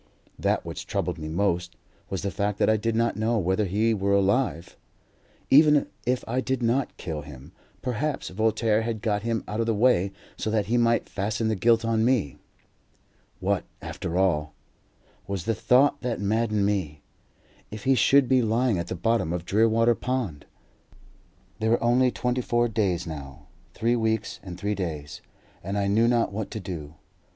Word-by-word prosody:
That - - 0
which - - -7
troubled 90 -2 -2
me 75 - -5
most 90 +1 -1 0.3
was 95 - -3
the 100 - -1
fact 100 +4 -1
that - - +3
I - - +3
did 110 +1 -1
not 115 -2 +1
know 115 +2 +1
whether 95 +2 +1
he 105 +5 +1
were 100 -1 0
alive. 100 -3 0 0.8
Even 150 +1 +6 0.2
if 125 0 +1
I 125 +3 0
did 130 -2 -2
not 125 +4 0
kill 80 -3 -5
him, 70 +1 -12 0.3
perhaps 135 +4 -2
Voltaire 110 +2 +1
had 110 -1 -4
got 105 -3 0
him 115 0 -2
out 105 +2 -4
of 115 - 0
the 115 - +1
way 100 -4 +3 0.3
so - - -2
that 105 -2 +1
he 115 +4 0
might 115 -1 +2
fasten 110 +3 -2
the 110 - +1
guilt 115 +3 +3
on 115 -1 +1
me. 115 - +1 1.0
"What, - - 0 0.2
after 85 +1 -5
all," 75 -6 +1 0.7
was 95 -3 -4
the 115 - +1
thought 130 +6 +3
that 120 -2 -2
maddened 105 0 +1
me, 85 -8 -2 0.7
"if 105 0 -8
he 135 - +4
should 135 +1 +4
be 130 0 +4
lying 115 -2 +1
at 85 - -4
the - - -4
bottom 115 -3 0
of 85 -1 -3
Drearwater 115 +3 +3
Pond?" 115 - -3 1.1
There 110 0 0
were 115 - +2
only 125 +2 +4
twenty 125 +1 -1
four 120 0 +1
days 100 -6 0
now. 70 -4 -8 0.3
Three 115 +1 +1
weeks 110 -1 -1
and 90 -2 -9
three 105 +1 -1
days, 80 -7 -5 0.4
and 95 +3 -3
I 100 - +1
knew 110 +4 +3
not 120 -3 +2
what 110 0 -4
to 110 - -5
do. 80 -6 -7
110 Hz, 180 wpm, -26 LUFS, 95-115 Hz, 1.1 s, Even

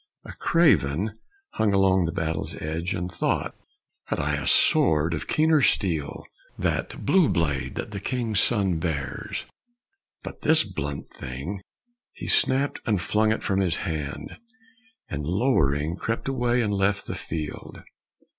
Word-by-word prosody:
A - - -8
craven 105 - +2 0.4
hung 105 -2 +1
along 95 -2 +4
the 85 - -1
battle's 80 -1 -3
edge, 80 +3 -3
And 90 +1 -4
thought, 85 - -1 0.5
"Had - - -2
I 75 +1 0
a 75 -2 -2
sword 80 +1 +4
of 75 - -4
keener 155 -1 +3
steel 80 - +1 0.3
That - - -2
blue 160 +3 +4
blade 70 -6 -1
that - - -5
the 100 - -4
king's 115 -1 -1
son 95 -8 +2
bears, 70 -6 -3 0.8
but - - -8
this 160 0 +4
Blunt 75 -8 -5
thing 70 +11 -6 0.3
!" 240 0 -51
he - - -8
snapt 135 +2 +3
and 105 -4 +2
flung 110 +5 +1
it 110 - -1
from 95 -1 +1
his 90 -4 +2
hand, 75 -4 -5 0.7
And 75 0 -4
lowering 80 - +1
crept 115 +5 -3
away 125 -2 +1
and 105 -2 -1
left 100 0 +1
the - - -4
field. 80 -2 -6
95 Hz, 145 wpm, -25 LUFS, 75-110 Hz, 0.8 s, along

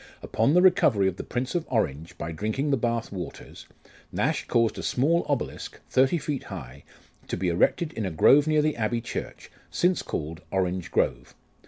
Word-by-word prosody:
Upon 115 +8 +1
the 180 - +6
recovery 120 - +4
of 95 -1 -2
the - - -5
Prince 125 +1 -3
of 175 -2 0
Orange, 85 - -1
by 80 - -4
drinking 110 - -2
the - - +4
Bath 115 -2 -1
waters, 90 -4 -8 0.4
Nash - - -1
caused 115 -1 +1
a - - -3
small 160 +7 +2
obelisk, 140 -4 -3
thirty 135 +6 +3
feet 145 -3 -4
high, 65 +4 -9 0.4
to - - -3
be 90 0 0
erected 150 - +1
in 110 -3 -2
a - - -1
grove 140 - +5
near 155 -1 +3
the 155 0 +1
Abbey 115 +1 0
church, 120 - -6 0.2
since 180 +1 +1
called 80 +2 -5
Orange 95 -2 -1
Grove. - - -1
115 Hz, 180 wpm, -26 LUFS, 90-145 Hz, 0.4 s, the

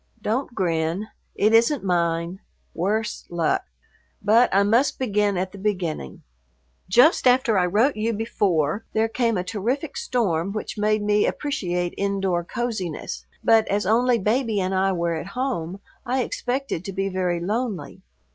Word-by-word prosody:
Don't 235 +4 -2
grin; 170 +2 -1 0.3
it 215 +2 +2
isn't 235 +4 +4
mine, 170 0 0 0.3
worse 210 +5 -2
luck! 170 -2 0 0.5
But 225 +4 +4
I 195 +1 +4
must 230 +7 +2
begin 210 -5 +1
at 185 +1 -2
the 200 - -11
beginning. 180 - -3 0.7
Just 250 - +5
after 250 -3 +4
I 180 -2 +3
wrote 225 +10 +2
you 220 +2 0
before, 205 -5 0
there 220 +1 +2
came 230 -1 0
a 180 - -1
terrific 240 - -3
storm 195 -7 -1
which 215 - -4
made 215 0 +1
me 210 0 +3
appreciate 180 - -2
indoor 195 -3 0
coziness, 195 -5 -4 0.2
but 225 -1 +4
as 200 -1 0
only 240 +4 +3
Baby 220 +1 0
and 185 0 -1
I 190 +1 +2
were 170 -2 -1
at 160 +2 -4
home 200 -9 -2 0.2
I 255 +1 0
expected 250 -9 -3
to 195 - -5
be 195 +1 -1
very 180 -2 -1
lonely. 200 - -3
205 Hz, 150 wpm, -23 LUFS, 180-230 Hz, 0.7 s, Just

